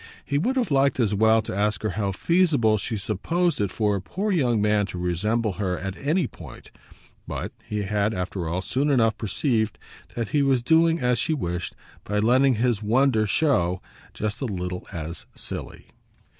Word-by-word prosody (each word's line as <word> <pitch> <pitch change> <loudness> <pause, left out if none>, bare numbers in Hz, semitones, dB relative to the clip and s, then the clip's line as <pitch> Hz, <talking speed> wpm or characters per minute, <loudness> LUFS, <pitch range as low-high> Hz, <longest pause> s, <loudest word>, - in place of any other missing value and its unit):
He 140 0 0
would 255 - 0
have 250 - 0
liked 140 0 +3
as 110 -4 +2
well 110 +2 +4
to 100 - -5
ask 105 0 0
her 110 - 0
how 100 0 -1
feasible 140 - +2
she 110 +2 -3
supposed 140 - 0
it 100 - +1
for 105 -1 +1
a 100 - -3
poor 200 - -2
young 125 - +2
man 105 -1 +2
to 95 - -7
resemble 105 +5 0
her 90 -2 0
at 95 0 -5
any 155 - 0
point; - - -11 0.6
but - - -4
he 105 -1 -3
had 105 +1 0
after 90 -4 -3
all 90 +3 -2
soon 140 +8 0
enough 115 -5 +3
perceived 110 0 -1 0.4
that 115 -3 -2
he 145 - +2
was 135 -3 +2
doing 165 +3 +4
as 125 -3 +1
she 160 - +1
wished 90 - -3 0.3
by 105 - -2
letting 125 +5 +4
his 115 -1 +1
wonder 115 0 +2
show 95 - +2 0.3
just 105 +2 -4
a - - 0
little 90 -4 -4
as 85 0 -6
silly. - - -6
110 Hz, 185 wpm, -25 LUFS, 100-135 Hz, 0.6 s, well